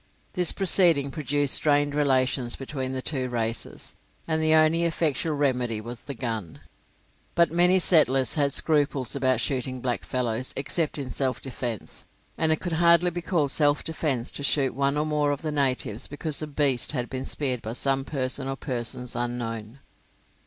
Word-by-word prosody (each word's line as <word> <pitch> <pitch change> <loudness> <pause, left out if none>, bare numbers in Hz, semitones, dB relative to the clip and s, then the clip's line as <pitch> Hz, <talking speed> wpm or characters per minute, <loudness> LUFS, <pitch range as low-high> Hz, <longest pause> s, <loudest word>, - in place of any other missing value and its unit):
This 180 -2 +3
proceeding 170 -7 +3
produced 145 -2 +1
strained 145 -1 +3
relations 130 -3 +1
between 130 -1 -5
the 130 -1 -4
two 130 -4 -1
races, 115 -1 -4 0.3
and 160 -1 0
the 155 0 +4
only 160 +2 +4
effectual 160 -2 0
remedy 125 -6 0
was 115 +2 -7
the 140 - -6
gun. 110 -9 -5 0.7
But 170 -1 +4
many 175 +2 +4
of 185 - +4
the - - +5
settlers 135 -7 +4
had 145 -2 +1
scruples 145 -4 +2
about 130 -3 +1
shooting 130 0 -2
blackfellows 125 0 -2
except 150 +3 -2
in 135 -3 -5
self 130 -2 -1
defence, 120 -4 -4 0.3
and 160 -1 +1
it 155 - +1
could 175 -2 -3
hardly 170 +1 +5
be 175 +1 -5
called 160 -5 0
self 145 0 +2
defence 145 -7 -2
to - - -4
shoot 140 -1 +2
one 140 +2 0
or 150 - 0
more 150 -1 0
of 145 +1 -3
the 155 - -2
natives 130 -5 0
because 145 +1 -4
a 155 - -4
beast 140 -3 0
had 125 -4 -2
been 130 -1 -5
speared 130 -5 -2
by 110 - -5
some 135 +1 -1
person 135 -1 -2
or 135 - -2
persons 125 -2 -4
unknown. 120 -1 -4
140 Hz, 175 wpm, -25 LUFS, 125-155 Hz, 0.7 s, the